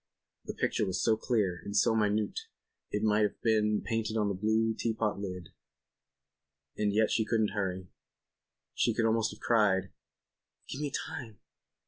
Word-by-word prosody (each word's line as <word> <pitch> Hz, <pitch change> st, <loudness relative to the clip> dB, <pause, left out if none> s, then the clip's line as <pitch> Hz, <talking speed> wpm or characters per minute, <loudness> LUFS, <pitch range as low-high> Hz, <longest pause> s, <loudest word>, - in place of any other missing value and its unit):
The -, -, -5 dB
picture -, -, 0 dB
was 95 Hz, -, -1 dB
so 110 Hz, -, +4 dB
clear 105 Hz, -6 st, 0 dB
and 100 Hz, +1 st, -3 dB
so 110 Hz, -, +4 dB
minute 105 Hz, -1 st, +1 dB, 0.5 s
it 105 Hz, +1 st, -2 dB
might 105 Hz, 0 st, +3 dB
have 105 Hz, -, 0 dB
been 105 Hz, -2 st, +2 dB
painted 115 Hz, -1 st, -1 dB
on 105 Hz, -2 st, +1 dB
the -, -, 0 dB
blue 110 Hz, +3 st, +1 dB
teapot 110 Hz, -2 st, -1 dB
lid. 90 Hz, -3 st, -6 dB, 1.3 s
And 105 Hz, -1 st, +1 dB
yet 110 Hz, +1 st, +2 dB
she 110 Hz, -, +2 dB
couldn't 110 Hz, -1 st, +1 dB
hurry. 95 Hz, -3 st, -3 dB, 0.9 s
She 115 Hz, -, +1 dB
could 115 Hz, -, +1 dB
almost 115 Hz, 0 st, +2 dB
have -, -, -13 dB
cried: 100 Hz, -5 st, +2 dB, 0.8 s
"Give 135 Hz, -, -5 dB
me 150 Hz, -, -1 dB
time." 130 Hz, -6 st, -6 dB
110 Hz, 155 wpm, -31 LUFS, 100-115 Hz, 1.3 s, so